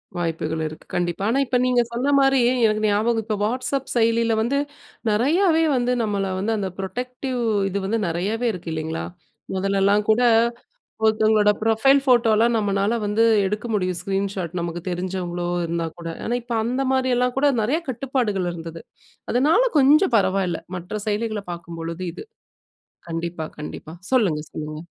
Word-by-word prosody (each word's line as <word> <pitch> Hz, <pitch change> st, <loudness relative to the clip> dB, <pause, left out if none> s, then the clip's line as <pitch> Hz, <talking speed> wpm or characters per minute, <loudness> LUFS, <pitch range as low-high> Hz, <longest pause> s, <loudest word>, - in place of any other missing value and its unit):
வாய்ப்புகள் 160 Hz, -2 st, -2 dB
இருக்கு 155 Hz, -, -10 dB
கண்டிப்பா. 175 Hz, +2 st, -1 dB
ஆனா, 265 Hz, +4 st, +2 dB
இப்ப 250 Hz, 0 st, +1 dB
நீங்க 250 Hz, -1 st, +3 dB
சொன்னமாரி 270 Hz, +1 st, +3 dB, 0.3 s
எனக்கு 215 Hz, 0 st, 0 dB
ஞாபகம் 220 Hz, +2 st, +1 dB
இப்போ 215 Hz, -1 st, -1 dB
WhatsApp 255 Hz, +3 st, -1 dB
செயலில 230 Hz, 0 st, +2 dB
வந்து 265 Hz, +5 st, 0 dB, 0.5 s
நிறையாவே 325 Hz, -, +3 dB
வந்து 245 Hz, 0 st, +1 dB
நம்மள 200 Hz, -2 st, -1 dB, 0.2 s
வந்து 210 Hz, +4 st, -1 dB
அந்த 195 Hz, -2 st, -2 dB
புரொடெக்டிவ் 250 Hz, +5 st, -4 dB, 0.3 s
இது 200 Hz, -, -3 dB
வந்து 225 Hz, +3 st, 0 dB
நிறையாவே 205 Hz, +8 st, -1 dB
இருக்கு 175 Hz, -2 st, -7 dB
இல்லேங்களா! 160 Hz, +1 st, -3 dB, 0.5 s
முதல்லலாம் 195 Hz, +2 st, +2 dB
கூட 225 Hz, +3 st, +3 dB, 0.8 s
ஒருத்தவங்களோட 215 Hz, -1 st, +4 dB
ப்ரொஃபைல் 225 Hz, +5 st, +4 dB
ஃபோட்டோலாம் 235 Hz, -2 st, +4 dB
நம்மனால 200 Hz, +1 st, +1 dB
வந்து 210 Hz, +2 st, +1 dB, 0.2 s
எடுக்க 210 Hz, +4 st, -2 dB
முடியும் 185 Hz, -3 st, 0 dB
ஸ்க்ரீன் 195 Hz, +2 st, -1 dB
ஷாட். 175 Hz, -3 st, -4 dB
நமக்கு 170 Hz, 0 st, -4 dB
தெரிஞ்சவங்களோ! 175 Hz, -1 st, -3 dB, 0.2 s
இருந்தாக்கூட. 165 Hz, 0 st, -4 dB, 0.2 s
ஆனா, 240 Hz, -, -1 dB
இப்போ 235 Hz, 0 st, -4 dB
அந்தமாரி 260 Hz, +1 st, 0 dB
எல்லாம் 250 Hz, 0 st, +1 dB
கூட 290 Hz, -, +3 dB, 0.2 s
நிறைய 265 Hz, +9 st, +1 dB
கட்டுப்பாடுகள் 235 Hz, -7 st, -1 dB
இருந்தது. 165 Hz, -1 st, -8 dB, 0.5 s
அதனால 305 Hz, -, +4 dB, 0.2 s
கொஞ்சம் 285 Hz, +1 st, +5 dB
பரவால்ல. 190 Hz, -4 st, +1 dB, 0.2 s
மற்ற 180 Hz, +5 st, -5 dB
செயலிகள 215 Hz, 0 st, -1 dB
பார்க்கும்பொழுது 170 Hz, +1 st, -6 dB
இது. -, -, -9 dB, 0.9 s
கண்டிப்பா, 165 Hz, -1 st, -3 dB
கண்டிப்பா, 155 Hz, +1 st, -7 dB, 0.2 s
சொல்லுங்க. 195 Hz, -13 st, +2 dB
சொல்லுங்க! 155 Hz, 0 st, -6 dB
210 Hz, 135 wpm, -22 LUFS, 175-245 Hz, 0.9 s, கொஞ்சம்